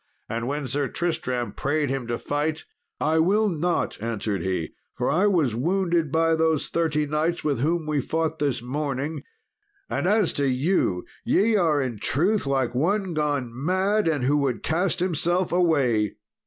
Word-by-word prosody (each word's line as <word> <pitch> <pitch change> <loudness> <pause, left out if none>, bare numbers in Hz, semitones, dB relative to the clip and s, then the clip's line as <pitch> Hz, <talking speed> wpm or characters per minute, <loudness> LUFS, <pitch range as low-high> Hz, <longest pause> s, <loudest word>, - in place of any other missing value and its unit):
And 115 +1 -3
when 145 +1 -2
Sir 135 +2 -1
Tristram 130 -8 -2
prayed 145 +4 -1
him 135 -3 -3
to 120 0 -1
fight, 150 +2 -2 0.3
"I 160 +1 +2
will 205 +6 +3
not," 175 - -1
answered 110 -3 -2
he, 90 -4 -2 0.2
"for 125 - 0
I 185 +5 +3
was 165 - +2
wounded 170 - 0
by 165 +1 +3
those 160 -2 +1
thirty 155 -3 0
knights 155 +3 -1
with 145 -5 0
whom 160 +4 0
we 150 -2 0
fought 160 +2 -2
this 140 -5 0
morning; 140 +3 -3 0.7
and - - 0
as 210 -2 +3
to 140 - +2
you, 130 - +1 0.2
ye 220 +3 +3
are 165 -7 +3
in 125 -6 -3
truth 180 - +1
like 135 -3 0
one 185 +7 0
gone 145 -5 -1
mad, 185 - +1
and 150 -5 +1
who 145 +3 +3
would 135 -4 -1
cast 175 +2 0
himself 175 +1 0
away! 140 - +2
150 Hz, 165 wpm, -25 LUFS, 130-170 Hz, 0.7 s, will